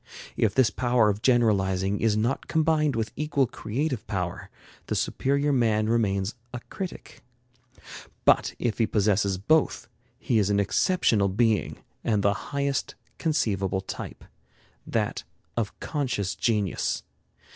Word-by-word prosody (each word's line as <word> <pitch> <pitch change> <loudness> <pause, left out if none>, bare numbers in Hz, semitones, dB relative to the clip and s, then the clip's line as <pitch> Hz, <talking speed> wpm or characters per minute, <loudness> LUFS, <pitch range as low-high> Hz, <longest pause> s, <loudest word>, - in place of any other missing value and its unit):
If 105 -2 +1
this 130 -3 +4
power 120 -3 +2
of 105 +1 -2
generalizing 100 -5 +2
is 110 -2 +2
not 120 +5 -1
combined 155 -3 +2
with 110 -1 -2
equal 150 -3 +1
creative 120 +2 -3
power, 90 -3 -3 0.4
the - - -1
superior 140 +2 0
man 110 -4 +2
remains 100 -3 +1 0.2
a - - -3
critic. 190 -2 -7 1.0
But - - +4
if 120 -1 -2
he 115 - +3
possesses 100 -2 +1
both, 155 +11 +1 0.3
he 120 -3 +1
is 100 -1 +1
an 100 0 +2
exceptional 100 - +2
being 110 +2 0 0.2
and 105 -3 +1
the 100 - +4 0.2
highest 140 -1 -1 0.2
conceivable 100 - 0
type, - - -7 0.6
that - - -1 0.3
of 115 -4 -3
conscious 125 - -2
genius. 105 -2 0
110 Hz, 125 wpm, -26 LUFS, 100-135 Hz, 1.0 s, this